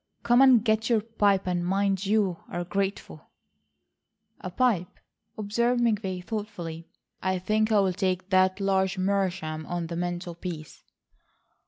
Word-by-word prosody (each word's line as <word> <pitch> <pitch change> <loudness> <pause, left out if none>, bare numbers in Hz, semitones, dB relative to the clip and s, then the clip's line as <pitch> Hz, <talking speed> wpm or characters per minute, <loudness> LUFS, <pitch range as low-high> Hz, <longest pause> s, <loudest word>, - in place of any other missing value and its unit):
Come 240 +2 +4
and 255 -4 +6
get 220 0 +1
your 230 -3 +3
pipe 205 -3 +1
and 175 -1 -1
mind 195 +1 0
you 200 -4 +2
are 175 - -3
grateful." 195 - -4 1.1
"A 185 - -6
pipe," 185 -3 0 0.4
observed 235 +4 0
McVay 205 -6 0
thoughtfully. 180 -7 -6 0.3
"I 185 0 0
think 215 +4 0
I'll 195 -3 +3
take 185 0 -2
that 185 +1 +3
large 190 -1 +1
meerschaum 185 -5 -1
on 175 -1 -3
the 170 +1 -5
mantelpiece." 175 -2 -5
190 Hz, 130 wpm, -27 LUFS, 180-215 Hz, 1.1 s, and